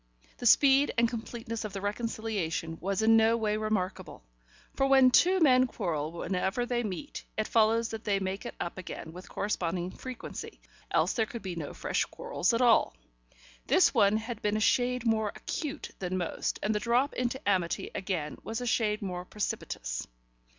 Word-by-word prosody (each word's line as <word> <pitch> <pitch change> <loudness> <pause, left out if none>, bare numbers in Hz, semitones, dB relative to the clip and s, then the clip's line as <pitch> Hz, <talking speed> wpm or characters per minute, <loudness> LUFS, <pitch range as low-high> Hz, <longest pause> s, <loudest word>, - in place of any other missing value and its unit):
The 245 - +1
speed 275 +4 +6
and 235 0 +5
completeness 230 -1 -5
of 210 -2 -5
the 195 - -4
reconciliation 205 -6 -3
was 195 +3 -1
in 225 +1 +6
no 225 +1 +4
way 215 -2 0
remarkable, 215 - -3 0.5
for 270 - +1
when 265 -2 +6
two 370 +8 +5
men 255 -5 +5
quarrel 160 -10 -3
whenever 190 +7 -1
they 245 -1 0
meet, 215 - -5
it 215 - 0
follows 225 +1 +3
that 225 0 -6
they 200 -2 +1
make 190 +1 -3
it 240 - -7
up 175 - -4
again 165 -2 -7
with 180 +2 -11
corresponding 180 -3 -2
frequency, 255 +3 -8 0.3
else - - +2
there 225 -2 0
could 235 -1 -7
be 185 -3 -4
no 155 -4 -6
fresh - - 0
quarrels - - -1
at 230 +1 +1
all. 230 - +4 0.7
This - - +5
one 200 +1 +4
had 225 0 -5
been 210 -1 +1
a - - 0
shade 245 +2 +2
more 220 -2 +1
acute 300 -1 -5
than 185 0 -2
most, 175 -2 -2
and 215 - +1
the 210 - 0
drop 245 +5 +1
into 250 +1 -1
amity 185 -4 0
again 175 -6 -3
was 225 +1 -3
a 250 - -4
shade 215 -3 +1
more 180 -2 -4
precipitous. - - -4
215 Hz, 180 wpm, -29 LUFS, 190-240 Hz, 0.7 s, speed